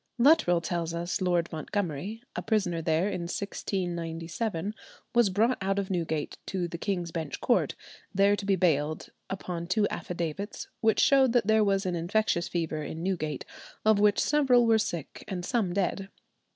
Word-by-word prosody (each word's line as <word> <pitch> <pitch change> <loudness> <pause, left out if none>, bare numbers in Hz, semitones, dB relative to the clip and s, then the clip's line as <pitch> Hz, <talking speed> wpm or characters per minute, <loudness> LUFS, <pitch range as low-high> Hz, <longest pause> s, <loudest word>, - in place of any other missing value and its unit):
Luttrell 235 - +5
tells 170 -1 -2
us 170 +2 -2
Lord 175 -2 +2
Montgomery, 180 +5 -3
a - - -2
prisoner 185 -7 0
there 160 +3 +1
in 190 -3 -2
1697, 175 +1 -3 0.4
was 240 -4 +5
brought 225 +7 +2
out 195 +1 0
of 195 -1 -2
Newgate 160 -4 -2
to 180 -2 -1
the 170 0 -7
King's 175 -4 -2
Bench 160 -4 -4
Court, - - +2 0.4
there 200 +1 +4
to 205 - -6
be 195 0 +2
bailed, 155 -4 +1 0.2
upon 175 -3 -4
two 205 +3 +2
affidavits, 175 +4 -4
which 220 -1 +3
showed 265 -3 +5
that 240 -4 +3
there 220 0 +4
was 195 -1 +1
an 180 - 0
infectious 170 +1 +1
fever 160 -3 -2
in 160 +2 -5
Newgate, 155 -7 -2 0.4
of 215 -1 +5
which 205 0 +4
several 265 -5 +4
were 225 -1 +4
sick 170 -8 -4
and 180 -2 -4
some 225 -8 0
dead. 195 +1 -1
185 Hz, 165 wpm, -28 LUFS, 170-210 Hz, 0.4 s, Luttrell